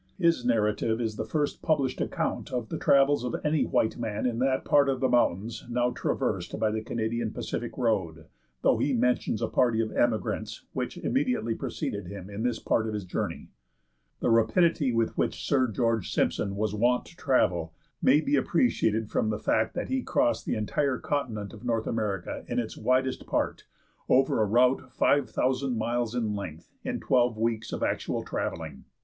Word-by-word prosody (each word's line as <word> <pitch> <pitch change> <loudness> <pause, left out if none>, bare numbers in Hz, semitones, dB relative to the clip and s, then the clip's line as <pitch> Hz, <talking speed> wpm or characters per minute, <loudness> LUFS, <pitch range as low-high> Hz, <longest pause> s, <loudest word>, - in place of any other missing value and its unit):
His 170 -8 +2
narrative 110 -1 +1
is 110 -3 -2
the - - -4
first 150 -2 -1
published 140 -5 0
account - - -2
of 120 -4 -3
the - - -4
travels 140 -2 +4
of 125 - -2
any 150 0 +2
white 110 - +1
man 110 -2 -2
in 120 -2 0
that 130 0 +1
part 140 -1 +4
of 135 -1 0
the 130 - +2
mountains 115 -2 +1
now 120 +1 +1
traversed - - -2
by 110 - +2
the 110 0 -2
Canadian 115 0 -2
Pacific 120 - -4
Road, 95 - 0 0.4
though - - +4
he 140 - +1
mentions 125 -2 +1
a - - +1
party 120 -3 +2
of 110 -1 0
emigrants 110 -2 -1
which 130 +5 -3
immediately 250 - 0
preceded 90 - -4
him 100 +1 -8
in 100 +2 -5
this 120 -1 0
part 110 0 0
of 110 - -3
his 105 -3 -4
journey. 90 - -4 0.7
The - - +2
rapidity 140 +4 +3
with 115 -1 0
which - - -1
Sir 130 -3 +3
George 115 -2 0
Simpson 100 -1 0
was 105 0 -1
wont 120 +4 +2
to - - -15
travel 85 - +1 0.3
may 145 +4 +5
be 285 - +1
appreciated 110 - +1
from 110 - +1
the 105 - -1
fact 110 0 0
that - - -3
he 265 0 0
crossed 295 +3 0
the - - 0
entire 130 +5 0
continent 115 -9 -3
of 110 - -12
North 115 -2 0
America 105 -5 -2
in - - -3
its - - -2
widest 130 +1 0
part, - - -1 0.4
over 130 -3 +4
a - - +4
route 125 +3 +3
five 140 -1 +2
thousand 130 -1 0
miles 120 +1 -1
in 110 -4 0
length, 85 -5 -7
in - - -2
twelve 120 -3 +2
weeks 115 0 -1
of - - -3
actual - - -1
travelling. - - -4
120 Hz, 180 wpm, -28 LUFS, 110-130 Hz, 0.7 s, may